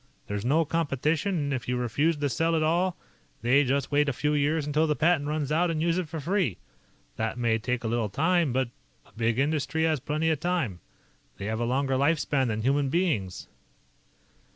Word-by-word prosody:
There's 105 0 -4
no 155 +7 +2
competition, 160 +4 0
and 145 -2 -1
if 130 - -4
you 125 0 0
refuse 145 +7 +1
to 145 0 0
sell 165 +7 +1
it - - +2
at 155 - +1
all, 175 +3 +1 0.5
they 130 +4 +4
just 135 +1 -1
wait 145 0 +3
a - - -1
few 150 +4 0
years 150 +1 +1
until 150 +2 +1
the 150 - +1
patent 160 -2 +2
runs 150 -1 -2
out 170 +3 +2
and 160 -2 -1
use 170 +2 +1
it 170 -4 -4
for 160 0 -5
free. 170 - 0 0.6
That 110 +1 -2
may 115 -2 +1
take 125 +2 -2
a - - -1
little 115 -1 0
time, 165 - +2
but 130 0 0 0.4
a - - -22
big 115 0 0
industry 155 +3 0
has 160 -2 +2
plenty 155 +5 0
of 155 - -1
time. 165 - -1 0.6
They 100 - -6
have 110 +1 -2
a 120 - 0
longer 135 +2 0
life 150 +5 +3
span 135 -3 0
than 110 -1 -2
human 140 +2 +2
beings." 140 - -1
145 Hz, 210 wpm, -27 LUFS, 125-160 Hz, 0.6 s, they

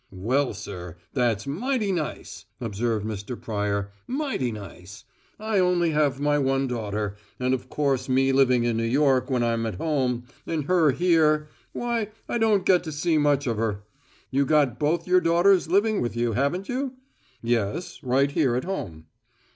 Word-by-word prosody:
"Well, 125 +9 0
sir, 90 -3 -8 0.2
that's 120 -6 +1
mighty 215 - -1
nice," 165 -5 -4
observed 110 -1 -2
Mr. 110 +2 -5
Pryor; 100 -2 -2 0.2
"mighty 265 - -1
nice! 100 -2 -10 0.4
I 215 -1 0
only 180 -2 +2
have 145 -3 +1
my 145 0 +2
one 135 0 +1
daughter, 105 -4 -3 0.2
and 125 0 +1
of 130 - -3
course 135 -3 0
me 135 +1 +3
living 130 -3 +4
in 120 -1 0
New 115 - 0
York 130 +1 +2
when 125 -3 +1
I'm 115 -1 0
at 110 - -4
home, 130 - -1 0.2
and 160 -3 -1
her 170 -2 +4
here, 155 -1 +3 0.2
why, 235 -3 -2 0.2
I 235 - -1
don't 210 -4 +3
get 180 -2 +4
to 160 - -4
see 155 +1 +1
much 145 -1 +2
of 115 -4 -1
her. 105 -2 -2 0.5
You 135 +1 +2
got 140 -4 +2
both 155 +5 0
your 180 0 +4
daughters 175 +2 +4
living 205 +3 +2
with 120 -1 -2
you, 120 0 0
haven't 140 - 0
you?" 260 +1 -2 0.5
"Yes, 115 - -1
right 135 +2 +2
here 140 -5 +2
at 125 - -1
home." 85 - -5
135 Hz, 170 wpm, -25 LUFS, 115-170 Hz, 0.5 s, living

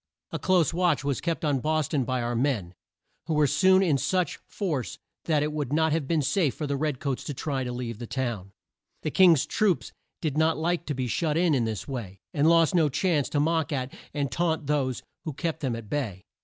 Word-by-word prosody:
A - - -3
close 180 -4 +3
watch 170 -5 +2
was 140 -3 -1
kept 165 +1 -2
on 145 -3 +2
Bos 155 +1 0
ton 140 -5 0
by 130 0 -1
our 120 0 -1
men, 115 -9 0 0.5
who 160 - 0
were 150 0 +4
soon 185 +7 +4
in 150 -7 +2
such 180 +7 0
force 160 - -3 0.3
that 150 -3 +2
it 150 0 -2
would 145 -4 -3
not 160 +1 +2
have 155 -3 0
been 160 -1 +1
safe 155 -2 +1
for 155 - -3
the 140 -1 -1
red 145 -2 -1
coats 140 -3 -2
to 145 - -4
try 135 -1 -2
to 125 - -3
leave 120 -3 -5
the 120 - -6
town. 115 -8 -3 0.5
The 155 - -1
Kings 170 -6 +6
troops 200 -5 +1 0.3
did 155 -2 -1
not 160 +1 +3
like 170 +2 -1
to 145 - -2
be 130 0 -1
shut 150 +5 0
in, 170 -2 +3
in 125 -4 +2
this 110 -5 -4
way, 105 -8 -6
and 150 +2 +3
lost 165 -2 +4
no 165 -4 +4
chance 155 0 +1
to 145 - 0
mock 160 +1 +1
at 130 -2 -2 0.2
and 140 -3 -2
taunt 160 +1 0
those 135 -3 0 0.2
who 155 - -4
kept 165 +3 -3
them 130 -5 -1
at 115 -2 -8
bay. 105 -8 -3
145 Hz, 225 wpm, -27 LUFS, 130-160 Hz, 0.5 s, Kings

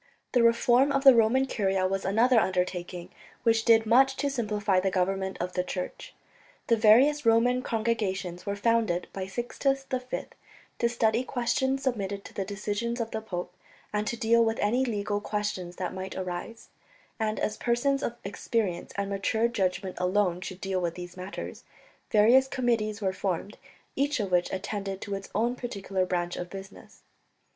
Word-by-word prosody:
The 245 - +3
reform 240 +4 +4
of 275 -1 +1
the 270 -1 +10
Roman 235 +3 +4
Curia 195 -6 0
was 195 +1 -1
another 230 +5 +4
undertaking, 180 -2 -2 0.3
which 225 -1 +3
did 225 -1 +5
much 265 +4 +5
to 280 +1 -1
simplify 210 -6 0
the 190 +1 +1
government 190 +1 -1
of 180 +1 -3
the 180 - 0
Church. 180 0 -6 0.5
The 230 - +3
various 245 +7 +5
Roman 235 +2 +3
Congregations 200 -7 -2
were 200 - -2
founded 215 -4 +1
by 190 -1 -4
Sixtus 270 +6 -1
V 255 -1 -3 0.6
to 235 - +2
study 230 0 +1
questions 265 +2 0
submitted 200 -6 -2
to - - -11
the 195 - -2
decision 210 +4 -3
of 230 -1 -3
the 220 - -3
pope 180 -4 -5 0.4
and 210 0 -1
to 235 - -2
deal 230 +1 +4
with 225 0 0
any 240 +5 +1
legal 205 -4 -1
questions 205 -4 -3
that 180 -1 -4
might 190 0 -6
arise; 185 +5 -6 0.5
and 220 -1 -1
as 210 - -1
persons 270 +3 +1
of 235 - -2
experience 200 -2 -2
and 200 0 -1
mature 220 +3 +1
judgement 190 -4 -2
alone 180 -1 +1
should 185 0 -7
deal 190 -1 -1
with 170 -1 -2
these 175 0 -8
matters, 185 +2 -7 0.5
various 235 +5 +5
committees 225 -5 -1
were 190 -1 +1
formed, 190 +1 -3 0.4
each 285 0 0
of 200 -3 -2
which 180 -1 +2
attended 195 0 -4
to 200 - -5
its 195 0 -5
own 235 +3 +1
particular 195 -6 -3
branch 175 -1 -2
of 175 - -5
business. 195 +1 -11
210 Hz, 170 wpm, -28 LUFS, 190-235 Hz, 0.6 s, the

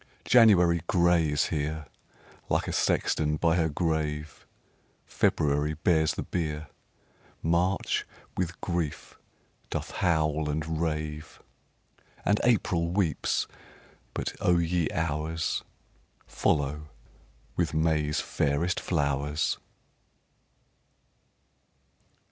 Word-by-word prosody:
4. - - -11
January 90 -8 +6
gray 85 -5 +3
is 75 -1 +2
here, 75 +1 -2 0.6
Like - - +1
a - - -2
sexton 75 -1 +1
by 85 +1 +2
her 80 -2 +2
grave; 75 -2 -2 0.6
_20 - - -25
February 75 +1 +1
bears 80 0 +2
the - - -3
bier, 75 -3 -3 0.7
March 85 +4 +1 0.3
with 90 -1 -2
grief 85 -4 -3 0.5
doth - - -4
howl 80 -3 +1
and 80 +1 -2
rave, 75 -1 -3 0.9
And 105 - +3
April 95 -8 +2
weeps 90 -5 0 0.7
but, - - -2
O 90 -1 +4
ye 85 -1 +1
Hours! 80 0 -1 0.6
Follow 75 +1 0 0.7
with 85 -3 0
May's 75 -1 +1
fairest 75 +6 0
flowers. 75 -2 0
80 Hz, 95 wpm, -28 LUFS, 75-85 Hz, 0.9 s, January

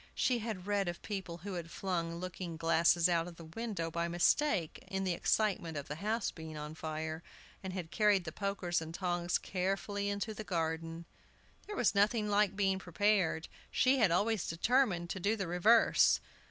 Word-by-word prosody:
She 250 -2 +2
had 215 -5 -5
read 200 -2 0
of 175 0 -3
people 190 -5 -4
who 200 - -4
had 170 -2 -5
flung 170 -2 -2
looking 175 -1 -5
glasses 165 +1 +4
out 170 -1 +1
of 175 - -9
the 165 - -11
window 165 -1 -4
by 170 +1 -1
mistake, 175 - +1
in 190 0 -2
the 185 -2 +1
excitement 175 -3 0
of 140 - -5
the 150 - -5
house 215 +4 -1
being 160 -2 -8
on 150 +1 -6
fire, 160 0 -4 0.4
and 190 - -5
had 175 -3 -5
carried 205 -3 +3
the 160 - -5
pokers 180 -2 -1
and 160 +1 -7
tongs 175 -1 0
carefully 195 +2 -2
into 205 +2 -2
the 215 - -6
garden. 165 -2 -3 0.6
There 420 - -5
was 235 - +2
nothing 210 +2 +2
like 205 -1 +2
being 195 -1 +1
prepared. 185 -2 +1 0.2
She 260 +1 +3
had 220 -5 +5
always 205 +3 +1
determined 175 -1 +1
to 190 - -3
do 205 +5 +1
the 195 -3 -3
reverse. 180 +7 +5
185 Hz, 180 wpm, -33 LUFS, 165-205 Hz, 0.6 s, had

